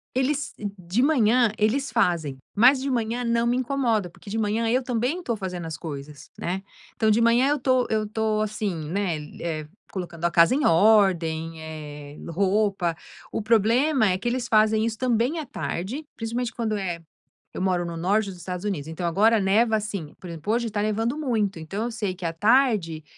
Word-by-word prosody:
Eles 275 Hz, +2 st, 0 dB, 0.2 s
de 180 Hz, +6 st, -1 dB
manhã 245 Hz, -5 st, +4 dB
eles 225 Hz, +5 st, +1 dB
fazem, 170 Hz, -, +1 dB, 0.2 s
mas 255 Hz, +6 st, +6 dB
de 270 Hz, -, -3 dB
manhã 235 Hz, 0 st, -1 dB
não 235 Hz, 0 st, +1 dB
me 245 Hz, +1 st, +2 dB
incomoda, 240 Hz, -8 st, 0 dB
porque 200 Hz, -, -14 dB
de 220 Hz, -, -3 dB
manhã 220 Hz, +1 st, 0 dB
eu 255 Hz, +3 st, +2 dB
também 250 Hz, +7 st, -1 dB
estou 245 Hz, -10 st, -2 dB
fazendo 180 Hz, -4 st, -5 dB
as 160 Hz, -, -5 dB
coisas, 145 Hz, -1 st, -8 dB
né. 185 Hz, +3 st, -3 dB, 0.3 s
Então 220 Hz, -1 st, +2 dB
de 215 Hz, -, +4 dB
manhã 235 Hz, +3 st, +4 dB
eu 295 Hz, -, +2 dB
tô 255 Hz, -1 st, +2 dB
eu 215 Hz, -1 st, 0 dB
tô, 215 Hz, 0 st, 0 dB
assim, 205 Hz, -7 st, -3 dB
né, 185 Hz, -3 st, -1 dB, 0.2 s
eh 155 Hz, -3 st, -3 dB, 0.2 s
colocando 175 Hz, -3 st, -5 dB
a 170 Hz, -, +2 dB
casa 170 Hz, +9 st, +5 dB
em 290 Hz, -, +1 dB
ordem, 165 Hz, -4 st, +3 dB
eh, 150 Hz, -2 st, -8 dB
roupa, 195 Hz, -1 st, +1 dB, 0.4 s
o 215 Hz, -, -3 dB
problema 230 Hz, +4 st, +3 dB
é 185 Hz, -, +1 dB
que 220 Hz, -, -5 dB
eles 245 Hz, 0 st, -1 dB
fazem 215 Hz, 0 st, +3 dB
isso 225 Hz, -, -3 dB
também 250 Hz, +5 st, +1 dB
à 305 Hz, -, -4 dB
tarde 245 Hz, -, -4 dB
principalmente 235 Hz, +1 st, -3 dB
quando 225 Hz, -2 st, -2 dB
é 180 Hz, -4 st, -3 dB, 0.5 s
eu -, -, -5 dB
moro 180 Hz, -2 st, +1 dB
no 170 Hz, -1 st, -5 dB
norte 200 Hz, +5 st, +1 dB
dos 180 Hz, -, -11 dB
Estados 180 Hz, +3 st, -5 dB
Unidos 160 Hz, -8 st, -2 dB
então 160 Hz, +2 st, -5 dB
agora 215 Hz, +6 st, +4 dB
neva, 220 Hz, +4 st, +3 dB
assim, 205 Hz, -8 st, -4 dB
por 180 Hz, -, -9 dB
exemplo, 165 Hz, +6 st, -4 dB
hoje 235 Hz, 0 st, +1 dB
está 205 Hz, -1 st, -2 dB
nevando 225 Hz, +5 st, 0 dB
muito, 220 Hz, -, -1 dB
então 195 Hz, +8 st, -4 dB
eu 240 Hz, -, -2 dB
sei 205 Hz, -5 st, -3 dB
que 180 Hz, -, -7 dB
à 165 Hz, -, -1 dB
tarde 210 Hz, -, +2 dB
215 Hz, 190 wpm, -25 LUFS, 175-235 Hz, 0.5 s, mas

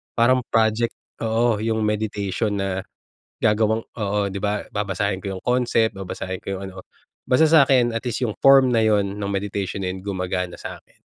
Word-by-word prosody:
parang 125 Hz, +2 st, +4 dB
project, 110 Hz, +1 st, +1 dB, 0.2 s
oo, 115 Hz, -1 st, +1 dB
’yong 110 Hz, 0 st, -1 dB
meditation 105 Hz, -1 st, -1 dB
na 95 Hz, -1 st, -2 dB, 0.6 s
gagawang 110 Hz, +1 st, +1 dB
oo, 105 Hz, -2 st, -1 dB
’di 100 Hz, 0 st, -4 dB
ba. 105 Hz, 0 st, -1 dB
Babasahin 100 Hz, -1 st, -1 dB
ko 95 Hz, -1 st, -4 dB
’yong -, -, -12 dB
concept, 120 Hz, -3 st, +2 dB
babasahin 95 Hz, -1 st, -6 dB
ko 95 Hz, 0 st, -4 dB
’yong 95 Hz, -, -7 dB
ano. 95 Hz, -, -9 dB, 0.5 s
Basta 125 Hz, +5 st, +5 dB
sa’kin 135 Hz, -6 st, +4 dB
at 115 Hz, -, -2 dB
least 120 Hz, +3 st, -1 dB
’yong 110 Hz, -, -2 dB
form 135 Hz, -2 st, +6 dB
na 115 Hz, -, +3 dB
’yon 105 Hz, -2 st, +3 dB, 0.2 s
no’ng 100 Hz, -, -2 dB
meditation 100 Hz, -1 st, -3 dB
na 90 Hz, -, -2 dB
'yon, 95 Hz, -, -8 dB
gumagana 90 Hz, -2 st, -3 dB
sa’kin. -, -, -10 dB
105 Hz, 175 wpm, -22 LUFS, 95-115 Hz, 0.6 s, form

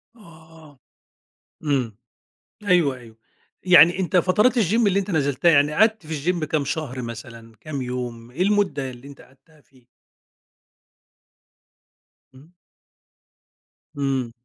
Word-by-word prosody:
آه، 160 Hz, -, -18 dB, 0.9 s
إمم، 130 Hz, -8 st, -1 dB, 0.7 s
أيوه 175 Hz, -9 st, +2 dB
أيوه. 115 Hz, -3 st, -15 dB, 0.5 s
يعني 180 Hz, -1 st, +6 dB
أنت 190 Hz, 0 st, -1 dB
فترات 210 Hz, +8 st, +3 dB
الgym 205 Hz, -2 st, +1 dB
اللي 200 Hz, -1 st, +2 dB
أنت 200 Hz, +1 st, -3 dB
نزلتها، 145 Hz, 0 st, +1 dB
يعني 145 Hz, -1 st, +3 dB
قعدت 220 Hz, -1 st, +2 dB
في 160 Hz, +2 st, -2 dB
الgym -, -, +1 dB
كام 155 Hz, -1 st, -1 dB
شهر 135 Hz, -3 st, -4 dB
مثلًا، 115 Hz, 0 st, -9 dB
كام 145 Hz, -4 st, -5 dB
يوم، 120 Hz, -2 st, -6 dB
إيه 150 Hz, +9 st, -3 dB
المدة 190 Hz, -9 st, 0 dB
اللي 125 Hz, +2 st, -13 dB
أنت 140 Hz, -, -14 dB
قعدتها 150 Hz, +4 st, -22 dB
فيه؟ 130 Hz, -4 st, -27 dB, 2.5 s
امم. 140 Hz, +6 st, -18 dB, 1.5 s
إمم. 135 Hz, -4 st, -2 dB
145 Hz, 115 wpm, -22 LUFS, 130-175 Hz, 2.5 s, يعني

